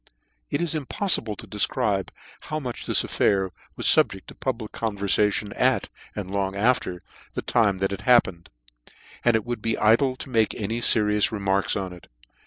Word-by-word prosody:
It - - -1
is 170 - +1
impoflible 145 - 0
to - - -8
defcribe 100 -2 0 0.4
how 155 - -1
much 125 -5 -6
this - - +3
affair 95 -2 +1 0.2
was - - -5
the - - +7
fubjecl 95 - -10
of - - -36
the - - -9
public 115 -5 -4
converfation 105 -1 0
at, - - +1 0.3
and 95 -3 -5
long 100 -1 -1
after, 100 -5 0 0.3
the - - -3
time 105 -5 +2
that 95 +1 -1
it 100 - -5
happened: 95 -9 +3 0.7
and 120 -1 +4
it 110 - 0
would 120 -2 -4
be 115 +1 -1
idle 120 +5 +3
to 135 - -9
make 110 -3 +2
any 115 +3 -3
ferious 105 -3 +3
remarks 100 -2 0
on 95 -3 -3
it. 90 - -14
105 Hz, 180 wpm, -25 LUFS, 100-120 Hz, 0.7 s, the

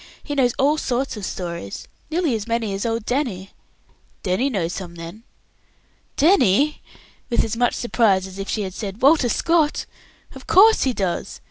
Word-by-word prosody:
He 290 - -5
knows 255 -4 +2
all 295 +3 +2
sorts 260 -1 -2
of 210 - -8
stories, 170 - -6 0.2
nearly 320 -4 0
as 220 -1 -3
many 230 -3 -1
as 195 +4 -2
old 225 -1 -2
Danny." 235 -8 -2 0.7
"Danny 190 +9 +1
knows 180 -8 -2
some, 175 -3 -7
then?" 170 +6 -9 1.0
"Danny!" 295 - +3 0.5
with 235 - +2
as 225 0 -3
much 245 +1 +1
surprise 215 -6 +2
as 190 +1 -10
if 195 - -5
she 210 -3 -1
said 200 +3 -7
"Walter 280 -3 +5
Scott!" 325 +2 +1 0.5
"Of - - -13
course 440 +4 +6
he 260 - +1
does. 190 -6 -3
230 Hz, 160 wpm, -22 LUFS, 195-275 Hz, 1.0 s, course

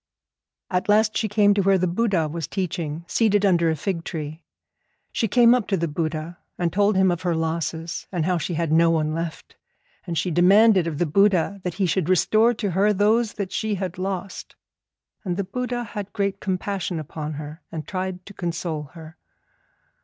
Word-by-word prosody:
At 180 +2 -1
last 215 +1 +4
she 220 - 0
came 205 0 +4
to 200 - +1
where 195 0 +4
the 185 - +1
Buddha 185 -3 +1
was 160 +1 -4
teaching, 170 -4 -3
seated 205 0 +2
under 170 -4 +3
a 160 - +1
fig 170 +2 -3
tree. 155 -1 -6 0.7
She 225 - 0
came 235 +2 +5
up 250 -4 0
to 195 - +1
the 170 0 -1
Buddha, 155 +2 -4 0.2
and 170 -2 -1
told 205 +1 +3
him 190 -1 +4
of 175 0 -3
her 175 -2 0
losses, 160 0 -3
and 175 -4 -1
how 180 -1 +1
she 170 +1 -3
had 165 -1 -1
no 165 +1 +5
one 155 -2 +1
left; 165 0 -6 0.5
and 170 -1 -3
she 180 - 0
demanded 190 +2 +5
of 155 -3 -3
the 175 - +1
Buddha 195 +3 +2
that 180 -2 -3
he 195 - +1
should 180 -1 0
restore 215 +5 +4
to 205 -3 -2
her 195 +4 +3
those 215 +3 +2
that 200 -3 -4
she 220 -1 -1
had 185 -2 -5
lost. 190 0 -5 0.7
And 180 -4 -2
the 200 - 0
Buddha 245 +5 -3
had 205 -3 -7
great 200 -2 -1
compassion 190 -2 -2
upon 155 0 -6
her, 150 +3 -8
and 160 -2 -6
tried 185 -2 -4
to 200 - -11
console 170 -4 -3
her. 160 0 -11
185 Hz, 190 wpm, -23 LUFS, 165-200 Hz, 0.7 s, came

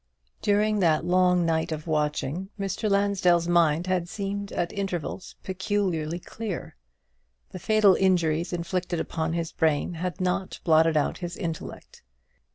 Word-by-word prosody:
During 210 +1 +2
that 165 -3 +2
long 180 0 +3
night 160 0 0
of 155 -1 -4
watching, 155 +3 -1
Mr. 195 +2 -2
Lansdell's 195 -4 +2
mind 170 -1 +3
had 180 -2 -1
seemed 200 +1 -4
at 175 -1 -2
intervals 190 -2 -4
peculiarly 185 -4 -1
clear, 205 +2 -6 0.8
the 185 - -7
fatal 215 +1 +5
injuries 170 -3 +2
inflicted 175 0 -2
upon 160 0 -2
his 165 -1 -2
brain 160 +1 +1
had 175 -1 -4
not 185 +1 -1
blotted 160 -1 +4
out 150 - 0
his 175 -1 -5
intellect. 165 -4 -6
175 Hz, 135 wpm, -26 LUFS, 165-195 Hz, 0.8 s, fatal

